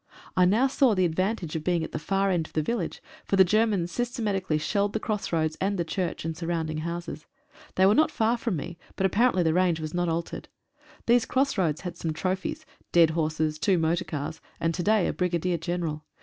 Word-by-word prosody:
I 180 - +5
now 215 +8 +4
saw 265 -4 +3
the 185 -1 +3
advantage 185 0 -1
of 160 - -3
being 175 -1 +1
at - - -5
the - - -3
far 195 +4 +1
end 165 -3 0
of - - -23
the 155 - +1
village, 235 +9 -3 0.2
for - - 0
the 190 - +8
Germans 200 -2 +1
systematically 210 - -1
shelled 200 +6 0
the 220 - 0
cross 215 -2 -3
roads 160 -2 0
and 195 +1 0
the 170 - -1
church 175 0 -3
and 165 -1 -2
surrounding 165 -2 -2
houses. 170 -1 -5 0.5
They 190 - +4
were 200 - +6
not 310 +7 +4
far 230 -5 +1
from 230 -4 -2
me, 165 +3 -6 0.2
but 190 - 0
apparently 205 -1 +3
the 160 -1 +2
range 180 -2 +2
was 155 -1 -5
not 175 -1 0
altered. 165 +1 -4 0.6
These 240 0 +3
cross 275 +2 +1
roads 165 -7 0
had 175 -2 -6
some 160 -2 -2
trophies 190 - -3
— - - -35
dead 165 -2 +5
horses, 155 -1 -1
two 190 +1 +3
motor 165 +2 +1
cars, 145 0 -5 0.2
and 165 0 0
to 175 - -2
day 210 0 +3
a - - 0
Brigadier 180 -1 0
General. 165 -2 -3
180 Hz, 220 wpm, -27 LUFS, 160-200 Hz, 0.6 s, the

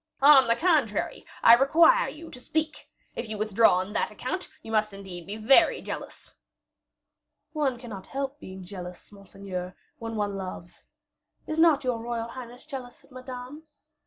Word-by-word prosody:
"On 275 -3 +8
the 230 - +3
contrary, 295 - 0 0.2
I 230 - +9
require 330 - +5
you 325 +2 -11
to 250 - -10
speak. 305 +3 -3 0.3
If 225 - -5
you 215 - -4
withdraw 215 -1 +4
on 185 +3 -2
that - - 0
account, - - -5
you 225 - -8
must 215 -1 +1
indeed 190 -4 -9
be 205 +2 -5
very 270 +10 +5
jealous." - - -8 1.2
"One 285 -5 0
cannot 225 -6 -9
help 275 +1 -4
being 190 0 -9
jealous, 180 0 -9
monseigneur, 195 -2 -7 0.2
when 225 0 -5
one 205 -2 -1
loves. 185 -2 -8 0.6
Is 310 +1 -3
not 320 -4 +5
your 250 -3 -1
royal 230 0 -4
highness 245 0 -10
jealous 265 -5 -8
of - - -24
Madame? 255 +4 -9
235 Hz, 160 wpm, -27 LUFS, 200-275 Hz, 1.2 s, I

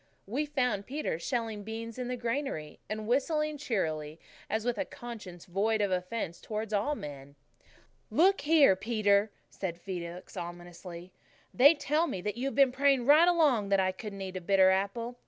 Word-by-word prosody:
We 275 +9 -2
found 250 -8 -1
Peter 275 - -3
shelling 225 +1 -2
beans 225 +2 -6
in 250 - -3
the 250 0 -3
granary, 235 - -3
and 215 0 -4
whistling 300 +4 0
cheerily, 160 - -2 0.3
as 220 +1 -1
with 245 -1 -1
a - - +2
conscience 220 -11 -9
void 210 +5 0
of 205 -2 +1
offence 180 -1 -3
towards 215 0 -4
all 215 +9 +1
men. 140 - -9 0.7
"Look 365 - +4
here, 295 -8 +5
Peter," 205 0 +2 0.2
said 175 -3 -5
Felix 175 -1 -7
ominously, 175 +1 -8 0.4
"they 285 +6 +7
tell 305 +3 +1
me 195 - -3
that 210 +1 -3
you've 265 +3 -3
been 275 -2 +5
praying 270 -1 +2
right 305 +5 +7
along 290 - +3
that 195 -1 +3
I 185 0 +2
couldn't 200 0 -8
eat 190 -1 -5
a - - -5
bitter 190 +1 +5
apple. 230 +6 -2
215 Hz, 170 wpm, -30 LUFS, 185-260 Hz, 0.7 s, they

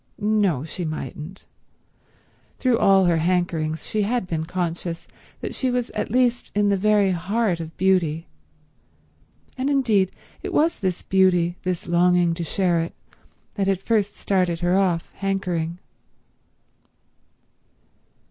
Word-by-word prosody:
No, 205 -9 +1
she 170 +3 -6
mightn't; 155 +2 -6 1.1
through 250 -3 +2
all 195 -1 +5
her 170 -2 +3
hankerings 165 -2 0
she 215 - -1
had 230 +1 0
been 160 -3 -3
conscious 170 -1 -3 0.3
that - - -4
she 260 - -1
was 245 -1 -1
at - - -3
least 245 -1 +1
in 205 0 +3
the 200 - +3
very 205 0 +3
heart 185 +1 0
of 165 -1 -8
beauty; 170 -4 +2 1.3
and 265 +2 0
indeed 225 -9 +2 0.3
it - - -5
was 325 +2 +2
this 185 -3 -2
beauty, 180 -2 +3
this 180 -2 -3
longing 175 0 +3
to 170 +1 -4
share 175 +1 +1
it, 165 +1 -3 0.6
that 195 -2 -1
had 195 -2 +1
first 205 0 0
started 180 -4 0
her 175 +1 +2
off 180 -4 +1
hankering. 180 -4 -2
185 Hz, 130 wpm, -23 LUFS, 170-205 Hz, 1.3 s, all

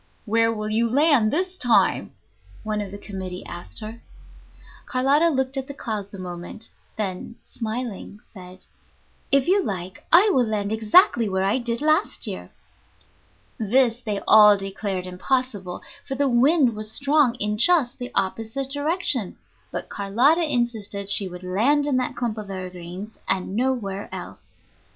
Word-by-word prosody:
"Where 225 +1 +2
will 215 -1 -4
you 230 +2 +2
land 280 -3 +4
this 370 +3 -1
time?" 225 - +2 0.5
one 215 -1 -2
of 200 - -5
the 200 - -8
committee 190 -3 -7
asked 175 +5 -7
her. 220 +2 -8 0.9
Carlotta 280 +6 +3
looked 265 -2 -1
at 265 0 -3
the 280 - -8
clouds 210 -6 -5
a - - -8
moment, 180 +3 -6 0.3
then, 200 +1 -4
smiling, 225 -3 -6
said, 185 -2 -8 0.7
"If 275 -1 +3
you 390 +3 +4
like, 185 - -5
I 390 +6 +7
will 250 -3 +2
land 205 -1 -2
exactly 220 - +4
where 190 0 0
I 200 +6 +1
did 235 +2 -3
last 310 +1 +2
year." - - -5 1.1
This 235 +2 +2
they 210 -4 -3
all 210 -1 +8
declared 195 -1 -4
impossible, 195 0 -2 0.2
for 270 - -3
the 280 +1 +1
wind 260 0 +3
was 215 0 -3
strong 280 -1 +2
in 210 -2 -2
just 275 -2 +3
the 245 0 -6
opposite 225 +7 -2
direction; 285 - -1 0.3
but - - -5
Carlotta 265 - +2
insisted 215 -5 -1
she 195 - +5
would 180 0 -9
land 235 +11 +2
in 285 -3 +1
that 255 - -1
clump 230 -3 -3
of 205 -2 -8
evergreens 185 +2 -8
and 190 0 0
nowhere 225 -5 -2
else. - - -9
225 Hz, 150 wpm, -23 LUFS, 200-265 Hz, 1.1 s, all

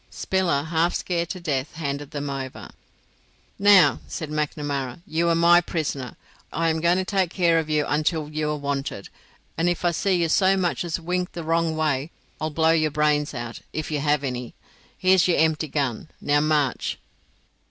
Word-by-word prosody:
Spiller, 180 -7 0
half 165 +2 +1
scared 170 -2 -2
to 185 - -5
death, 145 -5 -2
handed 145 -2 -4
them 145 -2 -4
over. 135 -2 -6 0.9
"Now," 200 -2 +6
said 155 -2 -5
Macnamara, 145 -2 -3
"you 170 +2 0
are 165 - +3
my 170 +1 +6
prisoner. 145 -7 -4 0.3
I 165 +1 0
am 160 0 -1
going 170 +2 +3
to 190 - -1
take 190 -3 +1
care 170 -2 +2
of 155 -1 -4
you 150 -1 +1
until 155 +1 0
you 155 0 -2
are 150 - -1
wanted; 140 -7 -4 0.5
and 170 +2 +3
if 175 0 -2
I 175 - +4
see 190 +3 +1
you 170 -1 +1
so 190 +4 +3
much 180 -2 0
as 170 -1 -2
wink 180 +2 -2
the 170 - -5
wrong 165 0 0
way 150 -2 0 0.3
I'll 155 - -1
blow 160 +1 +2
your 155 -1 +2
brains 150 -1 +1
out, 120 -1 -6
if 155 0 -4
you 150 - 0
have 145 0 +1
any. 125 -2 -4 0.4
Here's 185 -1 +4
your 175 - +2
empty 160 0 +2
gun. 135 -2 -2
Now 145 0 +2
march." 150 -3 0
155 Hz, 185 wpm, -24 LUFS, 145-170 Hz, 0.9 s, Now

